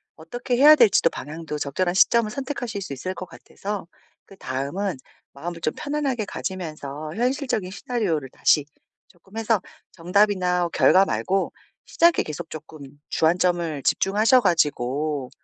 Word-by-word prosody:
어떻게 245 +10 -4
해야 295 +4 +8
될지도 195 - +5
방향도 155 +1 -6
적절한 175 +6 -1
시점을 215 +3 +4
선택하실 245 -6 -4
수 140 - -6
있을 185 +8 -4
것 185 - -7
같아서 195 +1 -7 0.4
그다음은 175 +2 -4 0.4
마음을 165 +4 -6
좀 155 - -1
편안하게 285 -6 -2
가지면서 155 -6 -6
현실적인 245 -5 -1
시나리오를 195 - -2
다시 145 +2 +2 0.4
쪼끔 190 +4 -16
해서 225 -2 +1 0.3
정답이나 180 -1 +1
결과 190 +1 +5
말고 195 0 -1 0.3
시작에 340 0 +3
계속 155 +2 -7
쪼끔 155 0 -10 0.3
주안점을 170 -3 +1
집중하셔가지고 155 - +2
180 Hz, 330 characters per minute, -23 LUFS, 155-215 Hz, 0.4 s, 해야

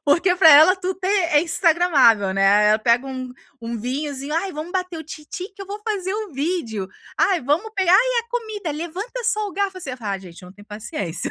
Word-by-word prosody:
Porque 340 +5 +3
para 325 -3 +7
ela 315 +6 +7
tudo 375 0 -4
tem 380 0 -1
é 310 -3 +3
Instagramável 310 - +3
né, 200 +2 +4
ela 215 +1 +4
pega 235 +4 +2
um 255 -1 -6 0.3
um 230 0 -5
vinhozinho: 280 +4 -4
"Ai, 375 +3 -1
vamos 310 +3 -6
bater 365 -3 -3
o - - -6
tim 305 0 -10
tim 370 +2 -6
que 395 - -9
eu - - -10
vou 405 +2 -7
fazer 385 -3 -2
o 425 -4 -5
vídeo. 270 - -2 0.3
Ai 375 -4 +2
vamos 305 - -1
pegar 375 -2 +2
ai 385 - +8
e - - +1
a 470 - -32
comida, 435 -8 -4
levanta 365 +11 -6
só 425 -1 0
o - - -10
garfo." 390 -1 -2
Assim, 285 - -5
ai 200 -3 -3
gente, 180 -1 -13
eu - - -11
não 180 - -13
tem 205 +1 -16
paciência. 205 -5 -5
320 Hz, 230 wpm, -21 LUFS, 235-380 Hz, 0.3 s, ai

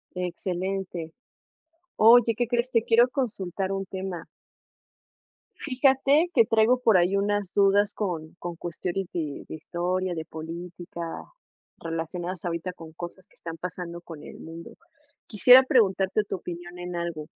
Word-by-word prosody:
Excelente. 180 -1 -3 0.8
Oye, 230 0 +6
¿qué 240 - +1
crees? 240 +1 0
Te 230 -3 +3
quiero 235 +2 +5
consultar 200 - -2
un 195 0 -3
tema. 190 -3 -5 1.3
Fíjate, 275 +4 +3
que 230 - +6
traigo 225 +3 +3
por 225 -5 +5
ahí 180 +2 +3
unas 205 -1 0
dudas 200 0 +4
con 165 -6 -4
con 175 -1 -6
cuestiones 175 +2 -4
de 155 -4 -4
de - - -6
historia, 175 +3 -2
de 160 -1 -4
política, 170 +2 -8 0.8
relacionadas 170 +2 -4
ahorita 170 +1 -3
con 165 -2 -12
cosas 175 +3 -9
que - - -28
están 165 -1 -7
pasando 175 0 -6
con 165 -3 -11
el - - -11
mundo. 165 +1 -10 0.5
Quisiera 250 +5 +8
preguntarte 205 -5 +2
tu 200 - -4
opinión 175 0 -8
en 180 0 -5
algo, 170 -3 -4
185 Hz, 140 wpm, -26 LUFS, 170-210 Hz, 1.3 s, Quisiera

